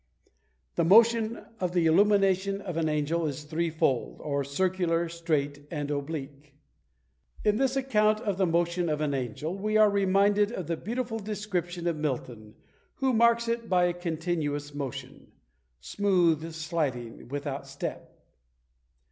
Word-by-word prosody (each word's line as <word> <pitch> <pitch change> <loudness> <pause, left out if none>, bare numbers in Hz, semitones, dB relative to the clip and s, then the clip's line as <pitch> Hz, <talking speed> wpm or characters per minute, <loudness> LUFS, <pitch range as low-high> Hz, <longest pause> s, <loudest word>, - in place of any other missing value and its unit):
The 170 - +3
motion 230 +4 +4
of 180 -1 -1
the 175 -2 +2
illumination 195 +2 +3
of 180 -4 -6
an 160 -1 0
angel 155 +2 0
is 145 0 -5
threefold, 155 -5 -1
or 140 -1 -1
circular, 170 +3 0
straight, 150 -4 -2
and 145 -3 -3
oblique. 140 -1 -5 0.9
In 210 0 +3
this 265 +1 +1
account 215 -5 +2
of 205 -6 -2
the 190 - +3
motion 170 +1 +1
of 150 -1 -1
an 150 -2 0
angel 135 +6 -3
we 215 +2 0
are 215 -1 +6
reminded 200 +1 +3
of 185 - -4
the 165 - -1
beautiful 225 +5 -3
description 190 -5 -3
of 170 -2 0
Milton, 120 -7 -4 0.4
who 270 -4 +1
marks 235 0 +4
it 230 0 -2
by 180 -1 +3
a 175 0 +2
continuous 160 -4 -3
motion, 140 -3 -7 0.5
"Smooth 170 - +1
sliding 150 -9 -3
without 140 +1 -4
step." - - -7
170 Hz, 140 wpm, -28 LUFS, 150-200 Hz, 0.9 s, are